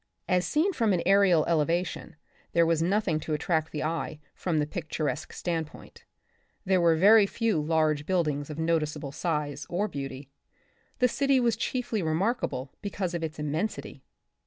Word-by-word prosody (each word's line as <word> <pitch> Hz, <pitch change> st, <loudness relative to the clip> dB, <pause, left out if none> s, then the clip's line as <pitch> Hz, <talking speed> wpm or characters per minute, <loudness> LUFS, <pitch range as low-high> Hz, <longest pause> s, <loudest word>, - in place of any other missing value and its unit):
As 180 Hz, -1 st, +1 dB
seen 345 Hz, +6 st, +1 dB
from 225 Hz, -, +2 dB
an 175 Hz, -, 0 dB
aerial 190 Hz, -4 st, +5 dB
elevation, 170 Hz, +2 st, -1 dB, 0.4 s
there 170 Hz, 0 st, +4 dB
was 165 Hz, -1 st, +1 dB
nothing 180 Hz, -2 st, +1 dB
to 155 Hz, 0 st, -2 dB
attract 160 Hz, +1 st, -1 dB
the 150 Hz, -, -3 dB
eye 160 Hz, -1 st, -3 dB
from 170 Hz, -4 st, -2 dB
the 150 Hz, -, +2 dB
picturesque 155 Hz, -1 st, -3 dB
standpoint 165 Hz, -3 st, -5 dB, 0.3 s
— -, -, -42 dB
there 185 Hz, -1 st, +3 dB
were 195 Hz, +6 st, +6 dB
few 220 Hz, -7 st, 0 dB
large 155 Hz, -1 st, +1 dB
buildings 155 Hz, -6 st, 0 dB
of 150 Hz, -, -6 dB
noticeable 155 Hz, -3 st, -1 dB
size 150 Hz, -2 st, -3 dB
or 195 Hz, +5 st, 0 dB
beauty. 135 Hz, -4 st, -7 dB, 0.7 s
The 250 Hz, -, +4 dB
city 275 Hz, +2 st, +2 dB
was 235 Hz, -3 st, +2 dB
chiefly 235 Hz, -2 st, -2 dB
remarkable 160 Hz, -, -1 dB
because 200 Hz, -3 st, -3 dB
of 170 Hz, -1 st, -3 dB
its 160 Hz, -1 st, -4 dB
immensity. 155 Hz, +8 st, -3 dB
165 Hz, 155 wpm, -28 LUFS, 155-195 Hz, 0.7 s, were